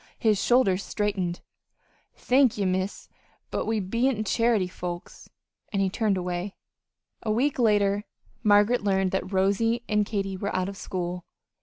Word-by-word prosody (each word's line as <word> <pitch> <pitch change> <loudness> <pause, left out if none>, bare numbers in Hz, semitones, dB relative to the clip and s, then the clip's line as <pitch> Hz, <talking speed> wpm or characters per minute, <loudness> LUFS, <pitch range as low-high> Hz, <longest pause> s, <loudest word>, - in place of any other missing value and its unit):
His 215 -4 +2
shoulders 200 -6 +3
straightened. 190 -4 -2 0.7
"Thank 255 -2 +3
ye, 200 - 0
Miss. 185 +1 -2 0.5
We 220 0 0
be 230 +7 +1
n't 220 -5 -2
charity 230 -3 +2
folks." 175 0 -7 0.4
And 200 - -1
he 195 -1 +1
turned 210 -2 +1
away. 180 +2 -3 0.7
A 225 - -4
week 260 +6 +1
later 205 -2 +2 0.4
Margaret 210 +2 +4
learned 190 -2 +1
that 190 0 -2
Rosy 205 +5 +1
and 210 -1 +2
Katy 195 -2 -3
were 200 +2 -3
out 185 +1 0
of 200 - -7
school. 180 -2 -4
200 Hz, 145 wpm, -26 LUFS, 190-225 Hz, 0.7 s, Margaret